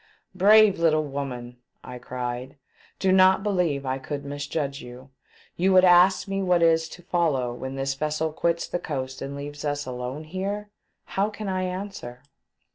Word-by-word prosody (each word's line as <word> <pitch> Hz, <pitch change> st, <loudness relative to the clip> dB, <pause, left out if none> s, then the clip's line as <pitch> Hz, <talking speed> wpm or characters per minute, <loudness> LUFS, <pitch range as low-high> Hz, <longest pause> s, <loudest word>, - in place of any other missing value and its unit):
"Brave 205 Hz, +1 st, +6 dB
litde 155 Hz, -2 st, +3 dB
woman!" 125 Hz, -3 st, -5 dB, 0.3 s
I 125 Hz, 0 st, -8 dB
cried, 125 Hz, +2 st, -5 dB, 0.4 s
"do 190 Hz, -, +1 dB
not 190 Hz, +1 st, +5 dB
believe 175 Hz, -9 st, 0 dB
I 130 Hz, 0 st, -2 dB
could 145 Hz, +1 st, -6 dB
misjudge 145 Hz, 0 st, -3 dB
you. 125 Hz, +2 st, -12 dB, 0.5 s
You 190 Hz, +2 st, +3 dB
would 185 Hz, 0 st, +7 dB
ask 180 Hz, +2 st, +5 dB
me 195 Hz, 0 st, -2 dB
what 180 Hz, -2 st, +2 dB
is 165 Hz, -1 st, +3 dB
to 175 Hz, -, -12 dB
follow 145 Hz, -10 st, 0 dB
when 130 Hz, +2 st, -6 dB
this 135 Hz, 0 st, -1 dB
vessel 155 Hz, +2 st, -2 dB
quits 170 Hz, +1 st, 0 dB
the 175 Hz, -, -3 dB
coast 130 Hz, -4 st, -5 dB
and 140 Hz, +1 st, -5 dB
leaves 145 Hz, +1 st, -7 dB
us 145 Hz, -1 st, -2 dB
alone 130 Hz, +4 st, -5 dB
there? 205 Hz, +2 st, -3 dB, 0.3 s
How 200 Hz, +2 st, -1 dB
can 215 Hz, 0 st, -7 dB
I 185 Hz, -1 st, -1 dB
answer? 180 Hz, -10 st, -6 dB
155 Hz, 165 wpm, -25 LUFS, 135-185 Hz, 0.5 s, would